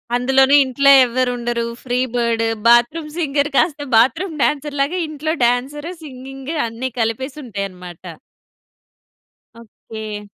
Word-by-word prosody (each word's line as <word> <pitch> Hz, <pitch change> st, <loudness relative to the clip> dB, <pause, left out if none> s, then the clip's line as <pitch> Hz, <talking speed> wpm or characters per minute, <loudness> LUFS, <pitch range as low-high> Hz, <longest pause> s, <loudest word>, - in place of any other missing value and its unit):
అందులోని 265 Hz, +3 st, +4 dB
ఇంట్లో 275 Hz, +2 st, +3 dB
ఎవ్వరు 250 Hz, +1 st, 0 dB
ఉండరు. 235 Hz, 0 st, -2 dB, 0.2 s
Free 250 Hz, -1 st, -1 dB, 0.2 s
bird. 235 Hz, -1 st, 0 dB, 0.2 s
బాత్రూమ్ 240 Hz, +7 st, +3 dB
సింగర్ 290 Hz, -3 st, 0 dB
కాస్త 290 Hz, -3 st, +1 dB
బాత్రూమ్ 310 Hz, +10 st, +2 dB
డాన్సర్‌లాగా 295 Hz, +3 st, -1 dB
ఇంట్లో 310 Hz, +1 st, -3 dB
డాన్సర్, 270 Hz, +6 st, -1 dB
సింగింగ్ 270 Hz, +1 st, -8 dB
అన్నీ 230 Hz, +3 st, -5 dB
కలిపేసి 260 Hz, +6 st, -2 dB
ఉంటాయనమాట. 185 Hz, -6 st, -7 dB, 1.6 s
ఓకే. 215 Hz, -2 st, -9 dB
260 Hz, 105 wpm, -19 LUFS, 235-285 Hz, 1.6 s, అందులోని